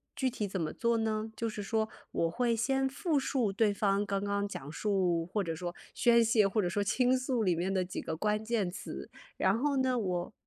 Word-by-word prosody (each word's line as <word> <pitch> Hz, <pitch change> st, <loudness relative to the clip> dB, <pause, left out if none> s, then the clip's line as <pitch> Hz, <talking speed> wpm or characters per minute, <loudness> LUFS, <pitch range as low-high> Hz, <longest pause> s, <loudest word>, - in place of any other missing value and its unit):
具 265 Hz, -, +1 dB
体 220 Hz, -4 st, -3 dB
怎 190 Hz, -2 st, -3 dB
么 155 Hz, -, -1 dB
做 235 Hz, 0 st, +1 dB
呢？ 220 Hz, 0 st, -1 dB
就 230 Hz, 0 st, -2 dB
是 210 Hz, -1 st, -5 dB
说 220 Hz, +2 st, 0 dB, 0.2 s
我 165 Hz, -, +1 dB
会 235 Hz, +5 st, +1 dB
先 270 Hz, +4 st, +1 dB
复 310 Hz, +3 st, 0 dB
述 255 Hz, -5 st, 0 dB
对 205 Hz, +1 st, +2 dB
方 200 Hz, 0 st, +1 dB
刚 200 Hz, -1 st, -1 dB
刚 200 Hz, 0 st, 0 dB
讲 145 Hz, -7 st, -7 dB
述 180 Hz, -3 st, +1 dB
或 195 Hz, +4 st, -1 dB
者 165 Hz, -3 st, -3 dB
说 175 Hz, +1 st, -4 dB, 0.2 s
宣 235 Hz, -1 st, +5 dB
泄， 220 Hz, -3 st, +4 dB
或 205 Hz, +2 st, +1 dB
者 180 Hz, -, 0 dB
说 205 Hz, +4 st, 0 dB
倾 250 Hz, +5 st, +3 dB
诉 255 Hz, -2 st, -1 dB
里 180 Hz, -4 st, +2 dB
面 180 Hz, +3 st, -1 dB
的 185 Hz, -1 st, +2 dB
几 180 Hz, -, -5 dB
个 160 Hz, -, -4 dB
关 210 Hz, +5 st, 0 dB
键 220 Hz, -5 st, 0 dB
词。 185 Hz, -, -7 dB, 0.3 s
然 190 Hz, +3 st, +3 dB
后 280 Hz, +3 st, +1 dB
呢， 260 Hz, -1 st, +2 dB
我 180 Hz, -2 st, -2 dB
210 Hz, 240 characters per minute, -31 LUFS, 190-235 Hz, 0.3 s, 宣